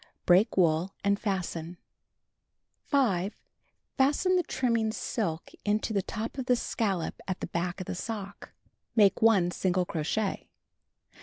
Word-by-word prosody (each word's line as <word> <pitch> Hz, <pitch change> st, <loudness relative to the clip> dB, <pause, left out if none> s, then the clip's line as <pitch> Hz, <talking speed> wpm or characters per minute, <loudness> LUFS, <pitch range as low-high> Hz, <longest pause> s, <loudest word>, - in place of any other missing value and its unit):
Break 185 Hz, +5 st, +4 dB
wool 170 Hz, +1 st, +2 dB
and 200 Hz, 0 st, +2 dB
fasten. 175 Hz, -4 st, -3 dB, 1.1 s
5. 205 Hz, -8 st, +1 dB, 0.6 s
Fasten 295 Hz, +7 st, +3 dB
the 360 Hz, -, +4 dB
trimming 230 Hz, -8 st, 0 dB
silk 170 Hz, -7 st, -3 dB
into 215 Hz, +1 st, 0 dB
the 200 Hz, -, +2 dB
top 225 Hz, +7 st, -5 dB
of 255 Hz, -, -4 dB
the 250 Hz, -, +5 dB
scallop 195 Hz, -7 st, -2 dB
at 185 Hz, -1 st, -2 dB
the -, -, -3 dB
back 175 Hz, +2 st, -3 dB
of 185 Hz, -, -5 dB
the -, -, -4 dB
sock. 205 Hz, +1 st, -6 dB, 0.4 s
Make 205 Hz, -4 st, +4 dB
1 200 Hz, -6 st, +5 dB
single 180 Hz, 0 st, 0 dB
crochet. 175 Hz, +6 st, -2 dB
200 Hz, 135 wpm, -29 LUFS, 180-225 Hz, 1.1 s, the